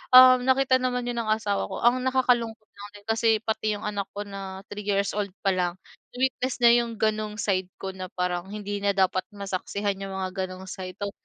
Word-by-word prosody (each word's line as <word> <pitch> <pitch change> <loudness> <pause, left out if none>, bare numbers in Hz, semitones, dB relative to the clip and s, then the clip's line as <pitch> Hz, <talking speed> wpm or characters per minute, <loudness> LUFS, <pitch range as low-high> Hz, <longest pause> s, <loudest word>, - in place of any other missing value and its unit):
um, 255 0 +10
nakita 260 0 +4
naman 250 -1 -1
'yon 240 -1 -2
ng 225 - -3
asawa 215 -2 0
ko. - - -6
Ang 250 +2 +3
nakakalungkot 235 -4 +1
lang 205 0 -10
din, 205 - -13
kasi 225 0 +2
pati 215 -1 0
yung 205 - -8
anak 205 -2 -2
ko 205 - -3
na 195 -1 -7
3 205 0 -6
years 200 -1 +1
old 205 -1 -1 0.2
pa 195 - +3
lang, 180 -2 0 0.4
na-witness 255 0 0
niya 235 - +9
yung 230 -1 -6
gano'ng 215 -1 0
side 190 -4 0
ko 190 0 -5
na 185 -1 -7
parang 180 0 -1
hindi 205 0 -4
na 200 0 +1
dapat 185 -1 +2
masaksihan 200 0 -3
yung 195 -1 -5
mga 185 -1 -3 0.2
gano'ng 185 0 -9
side, 185 -1 -7
though 200 - -2
205 Hz, 210 wpm, -26 LUFS, 195-230 Hz, 0.4 s, um